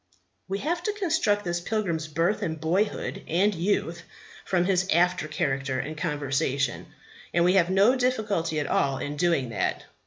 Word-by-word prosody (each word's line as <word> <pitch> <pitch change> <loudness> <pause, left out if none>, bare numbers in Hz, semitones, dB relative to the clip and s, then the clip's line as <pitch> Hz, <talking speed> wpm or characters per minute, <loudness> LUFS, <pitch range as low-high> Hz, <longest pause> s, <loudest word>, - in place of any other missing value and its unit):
We 195 - -2
have 340 +10 -2
to 420 +4 -1
construct 320 - +1
this 175 0 -1
pilgrim's 175 -6 -2
birth 165 +6 0
and 160 -1 -3
boyhood 185 +7 -1
and 195 +6 +2
youth 170 -1 -1 0.4
from 180 -2 +1
his 190 0 +1
after 175 -1 +2
character 135 -3 -1
and 155 +4 -4
conversation; 140 -4 -1 0.5
and 170 0 +4
we 180 - +4
have 180 -3 +4
no 200 +7 +4
difficulty 215 -11 0
at 145 - -1
all 135 -1 +1
in 145 +2 -4
doing 150 -5 +1
that. 115 - -2
175 Hz, 160 wpm, -26 LUFS, 155-205 Hz, 0.5 s, and